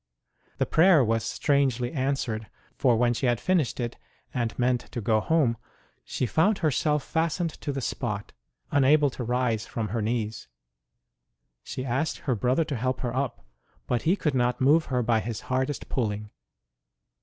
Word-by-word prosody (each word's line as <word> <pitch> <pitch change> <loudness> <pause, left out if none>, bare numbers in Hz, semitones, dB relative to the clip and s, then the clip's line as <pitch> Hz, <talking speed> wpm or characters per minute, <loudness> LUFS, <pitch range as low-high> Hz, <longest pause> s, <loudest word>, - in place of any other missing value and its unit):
The - - +1
prayer 165 -3 +5
was 115 0 +1
strangely 130 -3 +1
answered, 130 -6 -2 0.3
for 125 -3 +3
when 120 +1 +3
she 125 +2 -1
had 120 -2 +2
finished 175 -10 +1
it, 120 -1 -3 0.4
and 120 -3 -2
meant 125 -1 0
to - - -2
go 110 0 +2
home, 130 -2 +2 0.5
she - - -2
found 190 - +2
herself 150 -2 +1
fastened 165 +1 -1
to 145 - -2
the 135 -1 -3
spot, 105 -4 -3 0.4
unable 145 +1 +4
to 125 - -5
rise 120 -2 0
from 110 -3 -3
her 110 +3 -1
knees. 110 -1 -2 1.1
She 130 - -6
asked 135 +5 -1
her 135 - +2
brother 125 +7 +1
to 150 -3 -4
help 130 +2 -1
her 120 -1 -2
up, 130 - -2 0.4
but 120 -2 0
he 175 +4 +3
could 150 -7 -1
not 125 -1 +1
move 150 +5 +4
her 125 -2 0
by 115 -1 +2
his 110 0 -4
hardest 130 +2 -2
pulling. 105 -4 -2
125 Hz, 165 wpm, -27 LUFS, 115-145 Hz, 1.1 s, prayer